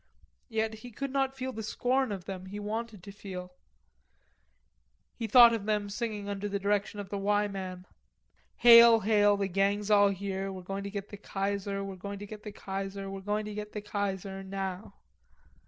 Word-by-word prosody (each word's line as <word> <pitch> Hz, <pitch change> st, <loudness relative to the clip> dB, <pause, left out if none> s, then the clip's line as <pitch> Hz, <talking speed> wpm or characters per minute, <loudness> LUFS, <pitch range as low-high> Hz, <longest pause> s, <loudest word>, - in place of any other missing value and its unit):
Yet 220 Hz, -1 st, -1 dB
he 245 Hz, -, -9 dB
could 275 Hz, +4 st, -5 dB
not 270 Hz, -1 st, 0 dB
feel 260 Hz, 0 st, -4 dB
the 220 Hz, -, -5 dB
scorn 250 Hz, +3 st, 0 dB
of 190 Hz, -3 st, -5 dB
them 190 Hz, -1 st, -6 dB
he 205 Hz, +2 st, -6 dB
wanted 215 Hz, -1 st, -4 dB
to 200 Hz, -, -9 dB
feel. 185 Hz, -3 st, -8 dB, 1.6 s
He 230 Hz, -, -4 dB
thought 235 Hz, +1 st, +8 dB
of 215 Hz, -2 st, -3 dB
them 210 Hz, -1 st, 0 dB
singing 210 Hz, -2 st, -3 dB
under 200 Hz, 0 st, -3 dB
the 200 Hz, -, -1 dB
direction 205 Hz, +1 st, -1 dB
of 200 Hz, -2 st, -6 dB
the 200 Hz, -, -3 dB
"Y" 205 Hz, +1 st, +2 dB
man: 185 Hz, -2 st, -6 dB, 0.7 s
"Hail, 235 Hz, -1 st, +9 dB
Hail, 205 Hz, -1 st, +4 dB
the 200 Hz, -1 st, 0 dB
gang's 200 Hz, +2 st, 0 dB
all 205 Hz, -1 st, +6 dB
here; 195 Hz, 0 st, -3 dB
We're 185 Hz, -1 st, -8 dB
going 195 Hz, +2 st, -5 dB
to -, -, -3 dB
get 200 Hz, 0 st, -6 dB
the 205 Hz, -, -8 dB
Kaiser, 200 Hz, 0 st, -3 dB
We're 195 Hz, -1 st, -6 dB
going 200 Hz, +2 st, -6 dB
to 205 Hz, -, -7 dB
get 210 Hz, 0 st, -9 dB
the 210 Hz, -, -7 dB
Kaiser, 195 Hz, 0 st, -5 dB
We're 195 Hz, 0 st, -6 dB
going 210 Hz, +2 st, -1 dB
to 210 Hz, -, -6 dB
get 210 Hz, 0 st, -6 dB
the 210 Hz, -, -4 dB
Kaiser, 195 Hz, -2 st, -3 dB
Now!" 195 Hz, 0 st, -5 dB
205 Hz, 190 wpm, -30 LUFS, 195-215 Hz, 1.6 s, Hail